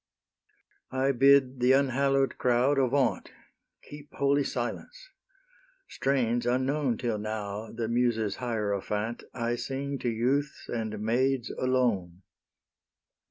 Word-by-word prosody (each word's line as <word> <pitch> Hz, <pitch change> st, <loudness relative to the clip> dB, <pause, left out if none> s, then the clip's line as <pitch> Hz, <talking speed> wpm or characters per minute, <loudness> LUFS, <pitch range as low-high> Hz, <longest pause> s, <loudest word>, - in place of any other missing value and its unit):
I 130 Hz, +1 st, +1 dB
bid 135 Hz, 0 st, +4 dB
the 125 Hz, +2 st, +4 dB
unhallow'd 135 Hz, 0 st, +2 dB
crowd 125 Hz, +3 st, +2 dB
avaunt! 130 Hz, -1 st, +1 dB, 0.5 s
Keep 145 Hz, 0 st, -12 dB
holy 140 Hz, +1 st, +2 dB
silence; -, -, -5 dB, 0.8 s
strains 120 Hz, -3 st, 0 dB
unknown 130 Hz, 0 st, 0 dB
Till 115 Hz, -4 st, -2 dB
now, 105 Hz, 0 st, -5 dB
the 115 Hz, -1 st, -3 dB
Muses' 115 Hz, -3 st, 0 dB
hierophant, 105 Hz, -1 st, -2 dB
I 120 Hz, -1 st, -1 dB
sing 135 Hz, +2 st, -4 dB
to 120 Hz, -, -1 dB
youths 130 Hz, +6 st, -1 dB
and 110 Hz, -2 st, -3 dB
maids 125 Hz, +3 st, 0 dB
alone. 110 Hz, -9 st, 0 dB
125 Hz, 105 wpm, -28 LUFS, 115-135 Hz, 0.8 s, bid